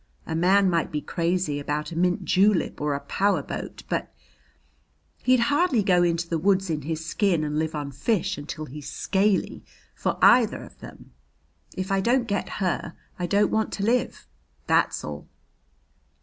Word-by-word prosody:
A 160 - -4
man 190 +4 +4
might 170 -3 0
be 150 - -1
crazy 170 -2 -1
about 150 +3 -3
a - - -6
mint 180 +1 +1
julep 195 -4 +2
or 145 -1 0
a 140 - -4
power 200 +1 0
boat, - - -7
but - - -2 1.1
he'd 255 -1 +3
hardly 290 - +2
go 180 -3 +3
into 170 -1 +1
the 165 -1 -1
woods 190 0 +2
in 155 -1 -2
his 160 +2 -4
skin 175 -2 +1
and 150 0 -1
live 160 0 -2
on 145 -1 -4
fish 200 - -1
until 155 0 -6
he's 145 +1 -9
scaly 195 0 0 0.3
for - - -2
either 235 -3 +5
of - - -15
them. - - -12 0.7
If 185 +1 -3
I 195 0 +2
don't 240 +4 +2
get 205 -2 -2
her, 180 -3 -2 0.2
I 175 - -1
don't 205 +2 +2
want 220 0 0
to 200 - -3
live. 240 - 0 0.4
That's - - +2
all." 75 -1 -7
180 Hz, 170 wpm, -25 LUFS, 155-200 Hz, 1.1 s, either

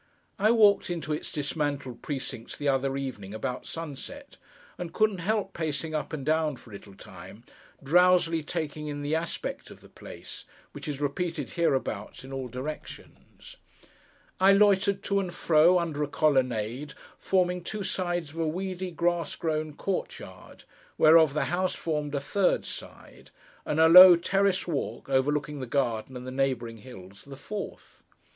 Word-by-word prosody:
I 210 +2 +4
walked 210 -5 +4
into 165 -3 -3
its 150 - -5
dismantled 145 -3 -3
precincts 130 -4 -6
the 145 - -3
other 135 0 +1
evening 110 -7 -6
about 125 +3 -4
sunset, 165 - -8 0.4
and 175 -2 -5
couldn't 215 -3 +2
help 200 +2 -1
pacing 155 -1 -3
up 155 - -3
and 145 -4 -5
down 155 -1 +1
for 120 - -16
a - - -12
little 100 -1 -11
time, 95 +4 -12 0.4
drowsily 175 +1 +4
taking 155 -1 -4
in 145 -1 -5
the 145 +2 -2
aspect 165 +1 -3
of - - -13
the - - -18
place: - - -11 0.3
which - - -9
is 145 -2 -4
repeated 145 +1 -3
hereabouts 135 -8 -1
in 135 +1 -9
all 135 -1 -4
directions. 130 +5 -9 0.8
I 190 +1 +6
loitered 200 -1 +3
to 200 0 +1
and 185 -3 -3
fro, 170 +2 +4
under 165 -4 -2
a 150 - 0
colonnade, 130 -3 0 0.2
forming 180 -2 +1
two 210 +3 -4
sides 175 -5 -2
of 165 - -9
a 165 - 0
weedy, 185 +2 -3
grass 175 0 -1
grown 155 -2 -2
court 195 +3 -3
yard, - - -13 0.3
whereof 155 -2 +6
the 150 - +1
house 185 +1 -1
formed 150 -3 -3
a - - +1
third 185 +7 +1
side, - - -10 0.4
and 150 - 0
a 160 - +7
low 180 +2 +11
terrace 195 +2 +1
walk, 150 -4 -4
overlooking 145 +2 0
the 130 - -5
garden 125 -1 -1
and 125 - -9
the 130 - -6
neighbouring 130 -4 -1
hills, 100 -5 -13
the 140 -1 -11
fourth. 205 +8 -8
155 Hz, 160 wpm, -27 LUFS, 135-180 Hz, 0.8 s, low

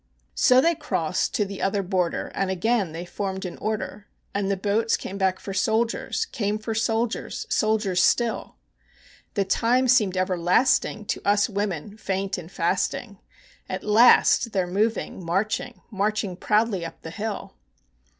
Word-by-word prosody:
So 255 0 +5
they 335 +4 +3
crossed 185 - -1
to 210 - +1
the 195 0 -7
other 195 +1 0
border, 180 -2 -1
and 195 - -1
again 195 0 0
they 165 +2 -6
formed 190 +1 -4
in 180 - -5
order; 210 -1 -4 0.3
And 200 -1 -1
the 195 - 0
boats 215 +4 +1
came 195 +1 -7
back 190 -1 +1
for 195 - -6
soldiers, 225 - 0
came 210 - -2
for 220 +1 -4
soldiers, 225 +1 -1
soldiers 210 -4 +2
still: 235 -2 +1 0.8
The 200 - +1
time 245 +6 +2
seemed 215 -7 +3
everlasting 185 +6 +2
to - - -2
us 205 0 +3
women 200 -1 -3
faint 195 -2 -2
and 170 0 -11
fasting, 190 +4 -1 0.5
At 185 - -4
last 230 +1 +5
they're 190 -3 +1
moving, 200 +1 -1
marching, 210 +7 -2
marching 205 -2 -1
proudly 210 -1 +1
up 165 0 -8
the 160 - -7
hill. 210 - -5
200 Hz, 150 wpm, -25 LUFS, 185-220 Hz, 0.8 s, So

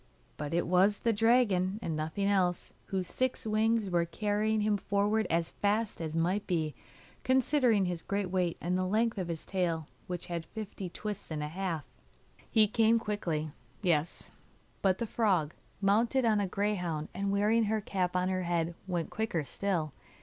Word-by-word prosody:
But 150 +2 -3
it 175 - +1
was 185 +4 +3
the 230 - +2
dragon 210 -4 +3
and 165 -8 -3
nothing 160 +6 -2
else, 185 -3 +1
whose 190 -2 -1
six 255 -2 -1
wings 220 0 +2
were 175 -2 +2
carrying 210 +4 0
him 210 0 +2
forward 205 +2 +1
as 165 0 +1
fast 210 -1 0
as 160 -1 -4
might 180 +5 0
be, 160 -5 0 0.5
considering 255 -5 +3
his 175 -2 -2
great 200 -1 -2
weight 180 -3 0
and 180 +1 -1
the 185 0 0
length 220 +2 +1
of 180 - -2
his 165 -2 -5
tail, 170 -4 -1 0.2
which 180 -1 -4
had 170 -2 -4
fifty 205 -4 -6
twists 210 +2 -6
and 155 -2 -3
a 150 - -3
half. 170 -2 -3 0.6
He 215 -2 +5
came 225 +2 +4
quickly, 170 -9 -2 0.3
yes; 165 -3 0 0.5
but 190 -1 +3
the 235 - -2
frog, 190 -9 +1 0.3
mounted 230 +6 +3
on 215 -2 +3
a 200 - 0
greyhound, 180 -6 -1
and 200 +2 -2
wearing 215 +3 +3
her 215 +1 +1
cap 185 -3 -2
on 180 0 +2
her 185 0 0
head, 170 -1 0
went 175 -3 -2
quicker 215 -8 -1
still. 160 0 -2
195 Hz, 170 wpm, -31 LUFS, 170-215 Hz, 0.6 s, He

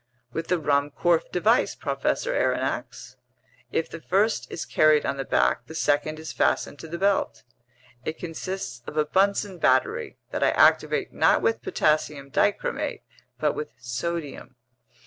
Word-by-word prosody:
"With 165 0 -3
the 180 - +2
Ruhmkorff 145 +3 +1
device, 215 +7 +2
Professor - - -1
Aronnax. - - -2 0.5
If 160 - 0
the 165 - -9
first 205 +6 +1
is - - -4
carried 155 -1 +4
on 140 - -1
the 135 - -2
back, 60 - +1
the 160 - -9
second 155 0 +1
is 160 0 -7
fastened 145 - 0
to 160 - -8
the 170 +2 -5
belt. 190 - 0 0.6
It 155 - -4
consists 165 -6 -5
of 150 - -7
a 155 - +3
Bunsen 195 +3 +1
battery 130 -4 +1
that - - -3
I - - +5
activate - - +3
not - - +3
with 115 0 +1
potassium 150 0 0
dichromate - - 0 0.4
but - - +1
with 150 - -6
sodium. 135 +6 -5
155 Hz, 145 wpm, -25 LUFS, 140-175 Hz, 0.6 s, I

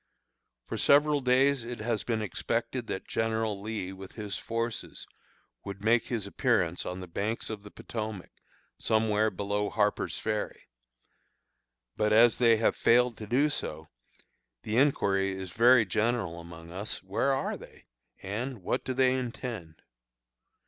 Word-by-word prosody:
For - - -4
several 145 0 +4
days 130 +1 +3
it 120 +1 -6
has 110 -2 -1
been 110 -2 -1
expected 100 - -2
that - - -4
General 110 -2 -1
Lee, 105 -3 -4
with 95 0 -10
his 105 -3 -5
forces, 115 0 -3 0.6
would 100 0 -7
make 115 +1 +3
his 115 -5 -2
appearance 100 - +1
on 90 +1 -4
the 90 - -7
banks 105 +7 -2
of 105 -2 -5
the 105 - -11
Potomac, 110 -3 -6 0.5
somewhere 110 -1 +2
below 105 0 -2
Harper's 105 -1 0
Ferry. 105 -1 -3 1.3
But 105 0 +2
as 115 +2 +6
they 115 -2 +5
have 110 - +2
failed 120 0 +4
to 110 - -7
do 130 +7 +3
so, 80 - -4 0.7
the 110 - -2
inquiry 95 -8 +2
is 95 -2 -6
very 120 +1 +6
general 105 -3 0
among 85 0 -11
us, 100 +5 -2
"Where 100 +8 0
are 135 0 -1
they?" - - -14 0.4
and, 110 +3 -4
"What - - -1
do 130 - -3
they 130 0 +4
intend?" 115 -9 -5
110 Hz, 145 wpm, -29 LUFS, 100-120 Hz, 1.3 s, as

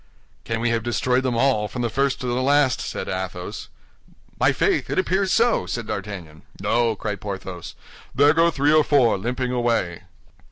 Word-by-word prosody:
"Can 115 0 -2
we 120 0 +1
have 115 0 0
destroyed 125 +2 0
them 130 -3 -1
all, 120 -4 +2
from 120 +4 -5
the - - +1
first 135 +2 0
to - - -4
the 125 +1 -1
last?" 140 -1 +3
said - - -5
Athos. 95 -1 -5 0.7
"My - - +4
faith, - - 0
it - - -2
appears 190 +1 +1
so!" 235 0 +2
said 115 -2 -4
D'Artagnan. 95 -7 -6 0.2
"No," 115 -1 +1
cried 105 -2 -5
Porthos; 95 -4 -7 0.4
"there 145 +2 +5
go 165 +1 +4
three 145 -1 +2
or 155 -1 +5
four, 135 -6 +3
limping 125 +5 -2
away." 115 -8 0
120 Hz, 175 wpm, -23 LUFS, 105-135 Hz, 0.7 s, there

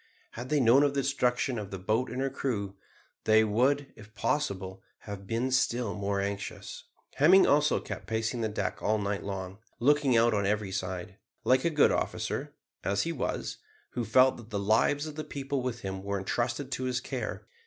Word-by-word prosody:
Had 120 +2 -7
they 150 - +2
known 125 +2 +6
of 145 -1 +2
the 140 - +2
destruction 125 -2 0
of 100 -2 -6
the 95 - -5
boat 110 +7 0
and 125 - -4
her 135 0 0
crew, 105 -8 -3 0.5
they 110 0 +6
would, 130 +7 +1
if 110 +1 -15
possible, 100 -7 -2 0.2
have 100 -2 -8
been 115 +4 -1
still 120 -4 +1
more 100 +1 -1
anxious. 100 0 -5 0.3
Hemming 180 +7 +7
also 150 +1 +3
kept - - -7
pacing 110 +1 -1
the 110 - 0
deck 100 -3 -3
all 110 +1 +2
night 100 -1 -2
long, 95 0 -5 0.2
looking 140 -1 +4
out 115 0 +4
on 100 -2 +1
every 105 -1 0
side, 95 0 -4 0.3
like 130 +3 +3
a - - +4
good 150 -3 +4
officer, - - -2 0.3
as 100 - +1
he 170 - -2
was, 155 - -3 0.3
who 120 - -2
felt 130 +4 +4
that 115 -2 -12
the 105 - -3
lives 110 +8 +2
of 155 -1 -7
the 155 - -3
people 140 -2 -3
with 120 -2 -3
him 95 0 -4
were 100 +1 -2
entrusted 120 +7 -2
to 130 - -2
his 125 -1 0
care. 110 -7 -5
115 Hz, 195 wpm, -29 LUFS, 100-130 Hz, 0.5 s, Hemming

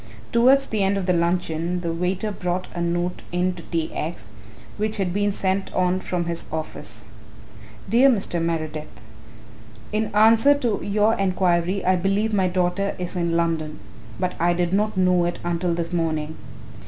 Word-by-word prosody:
Towards 265 +4 +5
the 215 -5 -2
end 195 +1 +2
of 195 - -2
the 180 - +2
luncheon 170 0 0
the 170 -1 -2
waiter 180 +5 -1
brought 180 -1 -3
a 175 - -3
note 175 +1 -1
in 180 +1 +1
to 175 - -9
T. 165 -1 -3
X. 155 - -5 0.5
which 215 +1 -1
had 185 -3 -1
been 205 +1 +1
sent 190 0 -1
on 185 0 +2
from 180 -2 -2
his 170 0 -3
office. 110 -9 -5 0.8
"Dear 245 +6 +5
Mr. 195 -8 0
Meredith, 155 -2 -3 1.0
"In 215 +1 +1
answer 225 +6 +6
to 240 -7 -1
your 210 +2 +2
enquiry 185 -1 +1
I 185 0 +4
believe 200 +4 0
my 190 -2 +3
daughter 180 +2 0
is 180 -1 -5
in 170 -1 0
London, 160 -2 -1 0.4
but 180 -1 -1
I 175 +1 +3
did 175 0 -1
not 210 0 +1
know 180 -1 +3
it 175 0 -2
until 175 0 0
this 170 0 -3
morning. 160 -2 -1
180 Hz, 165 wpm, -23 LUFS, 170-200 Hz, 1.0 s, answer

